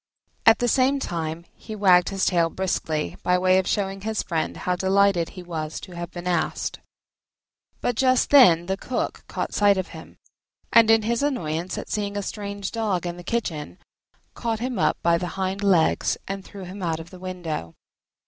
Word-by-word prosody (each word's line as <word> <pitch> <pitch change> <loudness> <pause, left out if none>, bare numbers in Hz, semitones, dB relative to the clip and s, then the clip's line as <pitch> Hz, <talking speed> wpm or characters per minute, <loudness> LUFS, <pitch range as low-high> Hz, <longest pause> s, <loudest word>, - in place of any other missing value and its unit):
At 225 - +8
the 245 - 0
same 265 +3 +3
time 165 -5 -4
he 220 - -9
wagged 185 -3 +5
his 195 -1 -1
tail 170 -3 +2
briskly, 165 -4 -2
by 180 0 +2
way 185 +1 +4
of 190 - -2
showing 195 -2 -1
his 220 +1 -2
friend 165 -3 -2
how 180 - -1
delighted 190 -2 +2
he 180 - -7
was 160 -3 -5
to 185 - -10
have 175 -1 -6
been 175 -1 -8
asked. 175 -2 -1 1.0
But 245 - -1
just 255 -1 +3
then 180 - +7
the 190 +2 -2
Cook 250 - -3
caught - - -4
sight 205 -1 +4
of 190 0 -3
him, - - -12 0.6
and, 230 -1 +7
in 225 -1 +5
his 235 +3 0
annoyance 175 - -2
at - - -5
seeing 205 -1 -2
a 205 - -2
strange 200 -1 -5
Dog 210 -6 -1
in 175 0 -3
the 175 - -9
kitchen, 165 - -3 0.6
caught 225 -2 -2
him 245 -3 -3
up 155 - +2
by 170 0 +3
the 180 - -3
hind 190 +1 -2
legs 185 -5 +2
and 195 0 -4
threw 195 0 -10
him 185 +2 -8
out 165 -3 -1
of 165 +1 -10
the 185 - -11
window. 175 - -5
190 Hz, 190 wpm, -24 LUFS, 175-210 Hz, 1.0 s, At